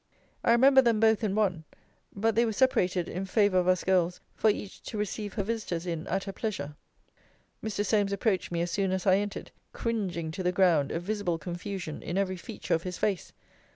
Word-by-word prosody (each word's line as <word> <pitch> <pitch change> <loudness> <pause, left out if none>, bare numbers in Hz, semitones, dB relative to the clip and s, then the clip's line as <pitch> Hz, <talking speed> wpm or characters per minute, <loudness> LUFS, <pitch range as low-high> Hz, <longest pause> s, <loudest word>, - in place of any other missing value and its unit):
I - - +4
remember 265 +3 +7
them 235 -4 +2
both 220 0 +4
in 200 -2 0
one: 190 -7 +1 0.5
but 220 +3 0
they 230 - +3
were 225 -2 0
separated 185 -8 +2
in 185 +3 -4
favour 200 -2 +3
of 180 - 0
us 185 -1 +3
girls, 180 -2 +2 0.2
for 220 - +3
each 205 -1 -3
to 220 - -5
receive 210 0 -3
her 200 - 0
visitors 200 -6 -3
in 165 -2 -4
at 195 0 -1
her 195 - -6
pleasure. 190 -11 -4 0.9
Mr. 205 -1 -2
Solmes 205 -2 +2
approached 195 -2 0
me 170 -1 -1
as 175 - -3
soon 195 -2 0
as 190 -1 -2
I 190 -1 +5
entered, 205 0 -4 0.2
cringing 185 -8 -2
to 185 - -5
the 180 0 +1
ground, 175 -7 +3
a 165 - -1
visible 190 -2 -2
confusion 175 0 -5
in 175 - -3
every 190 -1 0
feature - - -4
of 165 - +2
his 180 0 -5
face. 200 -4 -1
195 Hz, 205 wpm, -29 LUFS, 175-215 Hz, 0.9 s, remember